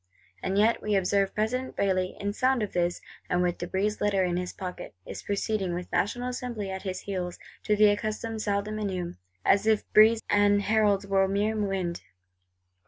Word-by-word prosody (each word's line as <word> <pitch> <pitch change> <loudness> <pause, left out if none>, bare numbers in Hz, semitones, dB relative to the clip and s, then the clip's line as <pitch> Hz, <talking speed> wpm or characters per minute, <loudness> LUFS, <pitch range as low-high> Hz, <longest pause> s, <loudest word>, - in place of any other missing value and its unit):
And 190 +1 -1
yet, 220 +3 +3
we 210 -1 0
observe, 195 +1 +1
President 250 +5 -1
Bailly 185 -2 0
in 205 0 -2
sound 255 +1 +2
of 205 - -4
this, 175 0 0 0.3
and 180 0 +2
with 175 -1 -1
De 175 - -4
Brézé's 205 +4 -1
Letter 200 -2 +2
in 175 -1 0
his 180 0 -2
pocket, 180 - -7
is - - -7
proceeding, 200 -3 -1
with 180 0 -6
National 245 +5 0
Assembly 240 -6 -4
at 190 0 -5
his 185 -2 -4
heels, 180 -3 -4 0.3
to 210 - +3
the 210 0 +6
accustomed 215 +2 -3
Salles 200 -1 0
des 215 - -5
Menus; 190 -5 -3 0.3
as 200 +2 +4
if 220 -1 +3
De - - +6
Brézé 220 +1 +7
and 205 0 +3
heralds 205 -2 +2
were 195 -1 +2
mere 205 +3 0
wind. 195 -5 -2
200 Hz, 190 wpm, -27 LUFS, 190-215 Hz, 0.3 s, Brézé